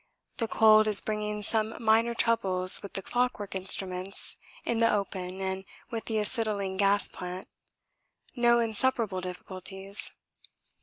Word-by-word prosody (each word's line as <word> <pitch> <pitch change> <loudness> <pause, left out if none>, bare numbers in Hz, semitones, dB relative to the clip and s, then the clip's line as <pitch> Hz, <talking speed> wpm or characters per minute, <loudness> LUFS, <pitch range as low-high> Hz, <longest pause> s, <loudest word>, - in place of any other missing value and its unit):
The 230 - -2
cold 215 -1 +5
is 210 -2 +7
bringing 210 -1 -4
some 220 +1 0
minor 230 +1 +2
troubles 185 -6 +3
with 200 - -10
the 195 - -4
clockwork 245 -4 -2
instruments 190 0 0 0.3
in 235 -1 -1
the 230 0 +3
open 190 -2 -3
and 190 0 -3 0.3
with 225 -2 -5
the 220 - -2
acetylene 210 -3 -1
gas 200 +1 +2
plant 180 +1 -8 0.9
no 240 -1 +3
insuperable 225 -3 +1
difficulties. 190 +2 -3
210 Hz, 125 wpm, -28 LUFS, 190-225 Hz, 0.9 s, is